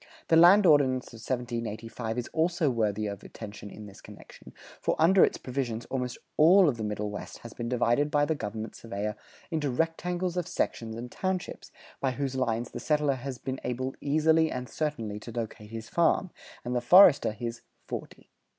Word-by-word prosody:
The 165 - +5
Land 180 +5 +7
Ordinance 135 -5 +4
of 115 - -10
1785 115 -1 -4
is 120 - -2
also 160 -2 +1
worthy 110 -3 0
of 100 -2 -5
attention 105 -1 -9
in 105 +1 -10
this 100 -1 -13
connection, - - -14 0.3
for - - +1
under 180 +4 +6
its - - +2
provisions 125 -3 -3
almost 125 -2 -2 0.2
all 180 +4 +7
of 130 -5 +1
the 110 - -4
Middle 105 0 -3
West 105 - -7
has 115 - -9
been 120 -1 -5
divided 125 +4 +2
by 145 0 +2
the 160 - 0
government 110 -4 -5
surveyor 105 -1 -4 0.4
into 155 -3 -1
rectangles 175 +5 -1
of 180 -1 -1
sections 115 -9 -2
and 120 +1 -7
townships, 185 -1 -4 0.3
by 135 -2 0
whose 135 0 -3
lines 120 -3 -1
the - - -6
settler 150 -2 +1
has 130 0 -6
been 130 +2 -5
able 130 +2 -3
easily 160 +2 +3
and 125 -2 -4
certainly 115 -10 -3
to 115 - -9
locate 110 -2 -6
his 115 0 -7
farm, 170 +2 +2 0.3
and 125 +1 -2
the 120 - +1
forester 165 - +7
his 115 +2 -6 0.2
"forty." - - -8
125 Hz, 180 wpm, -28 LUFS, 115-155 Hz, 0.4 s, Land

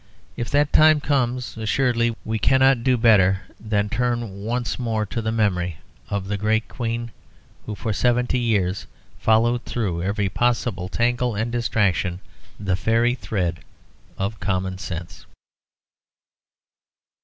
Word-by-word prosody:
If 120 - -4
that 145 0 +2
time 155 -1 +6
comes, 130 -4 -1
assuredly 115 +1 +1
we 110 0 -1
cannot 130 +1 +4
do 130 -1 +3
better 100 -4 +4 0.2
than 105 -1 0
turn 115 -3 -2
once 120 +3 -2
more 110 -3 -1
to 100 +4 -4
the 110 0 -1
memory 90 -7 0 0.3
of 100 -1 -2
the 100 0 -2
great 110 +2 +1
Queen 120 -1 -4 0.6
who 105 - -4
for 110 +1 -3
seventy 125 +3 +1
years 100 -6 0 0.3
followed 115 +2 +3
through 95 -8 -2
every 100 +2 0
possible 115 -3 0
tangle 120 +1 0
and 110 +3 -2
distraction 100 -6 0 0.4
the 100 -3 0
fairy 115 +5 +2
thread 90 -7 -2 0.6
of 100 +3 -3
common 95 -1 -2
sense. 85 -2 -7
110 Hz, 130 wpm, -23 LUFS, 100-120 Hz, 0.6 s, time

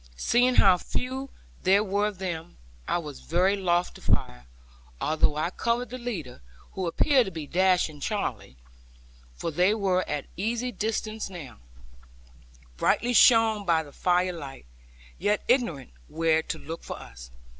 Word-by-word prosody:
Seeing 245 - +3
how 185 -2 +6
few 260 +6 -4 0.3
there 195 +2 +4
were 205 +1 0
of 210 -3 -6
them, 175 -3 -5 0.3
I - - +1
was 150 -5 -7
very 185 +4 +2
loath 180 -2 0
to - - -14
fire, - - -1 0.5
although 155 -1 +1
I 155 +3 -1
covered 235 +4 -1
the 255 - -6
leader, 175 - -6 0.3
who 190 -2 -3
appeared 260 - +3
to 190 - -5
be 160 -3 -6
dashing 180 -2 +2
Charley; 115 - -3 0.8
for 165 - -4
they 180 +7 +3
were 190 -4 +1
at 150 -1 -2
easy 235 +6 -2
distance 215 0 -3
now, 160 - -10 1.2
brightly 245 - +1
shone 225 -3 +5
by 165 -4 +2
the 145 - -14
fire 180 0 +1
light, 140 - -9 0.5
yet 210 0 +1
ignorant 235 - +1 0.2
where 160 0 +2
to 160 - -5
look 160 +3 -7
for - - -7
us. - - -12
185 Hz, 150 wpm, -27 LUFS, 160-215 Hz, 1.2 s, how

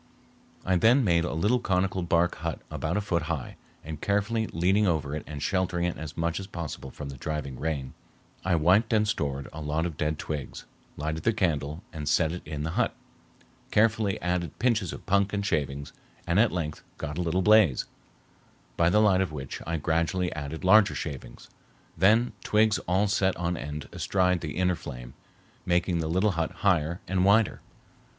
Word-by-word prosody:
I 95 0 +3
then 120 +9 +5
made 85 -5 +3
a - - -3
little 105 +10 +2
conical 95 -3 0
bark 85 0 +1
hut 80 -1 -3
about 85 +5 -2
a - - +1
foot 85 -4 0
high, 75 -6 -3 0.3
and, 80 0 -7
carefully 105 +2 0
leaning 95 +5 +2
over 75 -4 0
it 75 - -5
and 75 -1 -6
sheltering 90 0 0
it 90 - -1
as 75 -1 -7
much 85 +1 -1
as 95 - -7
possible 80 -7 -6
from 70 +1 -8
the 70 - -8
driving 75 -2 -4
rain, 70 -5 -3 0.5
I 95 -1 +2
wiped 95 +9 +3
and 105 -1 +3
stored 70 -9 -2
a 80 - -7
lot 75 +2 -1
of 85 -3 -4
dead 75 0 -1
twigs, 75 -3 -5 0.3
lighted 80 +2 -3
the 115 - +2
candle, 80 -5 -1
and 75 -2 -3
set 80 0 +3
it 90 - -5
in 75 -1 -4
the 80 - -2
hut, - - 0 0.7
carefully 110 -2 +2
added 90 -3 -1
pinches 115 -8 +1
of - - -9
punk 100 +1 +2
and 100 -1 -1
shavings, 70 -6 -2 0.3
and 85 +4 +2
at 115 +1 +4
length 80 -4 -3 0.2
got 75 +3 -5
a - - +1
little 90 +2 0
blaze, 105 -10 +5 0.9
by 85 0 +4
the 105 +4 +4
light 95 -3 +4
of 95 - -1
which 70 -3 -6
I 85 0 -1
gradually 85 +4 0
added 75 +1 -6
larger 100 +2 +6
shavings, 70 -6 -7 0.5
then 110 +8 +4
twigs 110 0 +3
all 95 +4 +2
set 95 -1 +1
on 90 0 -1
end 75 -3 -6
astride 90 -2 +1
the 80 -1 -5
inner 90 0 +2
flame, 60 -6 -9 0.5
making 90 0 +1
the 80 -1 -2
little 95 +5 +2
hut 80 -3 -1
higher 85 -1 +1
and 90 -1 +1
wider. 100 +2 +3
85 Hz, 185 wpm, -27 LUFS, 75-95 Hz, 0.9 s, larger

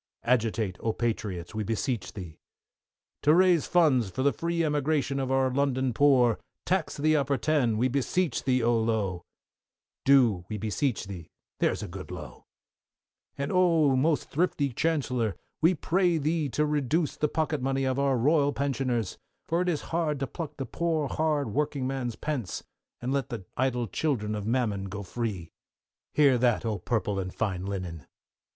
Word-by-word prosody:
Agitate, 110 -6 +1
oh, 110 - -1
Patriots, 105 -7 -3
we 110 0 -2
beseech 110 -3 -2
thee! 90 -6 -9 0.8
To 150 +2 +5
raise 180 -3 +4
funds 145 - +3
for 130 +7 -3
the 140 -1 +3
free 170 +6 -1
emigration 145 -2 0
of 130 -1 -2
our 135 -1 +2
London 130 -2 +1
poor, 125 -3 +4 0.3
tax - - 0
the 155 +2 +3
"Upper 140 -2 +1
Ten," 130 -5 +1
we 125 +3 +3
beseech 140 +7 0
thee, 130 -2 +2
oh, 115 0 +3
Lowe! 105 -6 -1 0.8
Do, 120 -10 +4
we 110 - -3
beseech 110 +3 -1
thee, 90 -4 -8 0.3
there's - - +1
a - - -5
good - - -8
Lowe! - - -9 0.9
And, 140 0 -2
oh, 165 -6 +4
most 150 +4 +1
thrifty 145 -4 0
Chancellor, 125 - 0 0.3
we 170 +3 +5
pray 175 +3 +2
thee 155 0 0
to 150 +4 +1
reduce 150 +2 0
the 150 - +1
pocket 155 -3 -1
money 135 +1 0
of 130 0 0
our 140 -2 +2
Royal 145 +3 +3
pensioners, 130 -6 -1 0.3
for 170 +2 +1
it 180 - +1
is 160 -4 -1
hard 155 -4 0
to - - +1
pluck 150 +3 -7
the 135 - -3
poor 160 -3 -1
hard 150 -7 0
working 145 -2 -1
man's 130 -3 -2
pence, 135 - -3 0.4
and 125 +2 -1
let 140 -3 -1
the 115 -7 -6
idle 125 -2 0
children 110 -3 -1
of 105 -1 -4
mammon 110 -5 0
go 100 +1 -6
free. 100 -5 -4 0.6
Hear 140 -5 +5
that, 120 -2 +2
oh, 110 -3 -1
purple 105 0 -1
and 95 -1 -3
fine 95 -3 -2
linen! 90 -7 -5
130 Hz, 165 wpm, -28 LUFS, 110-150 Hz, 0.9 s, To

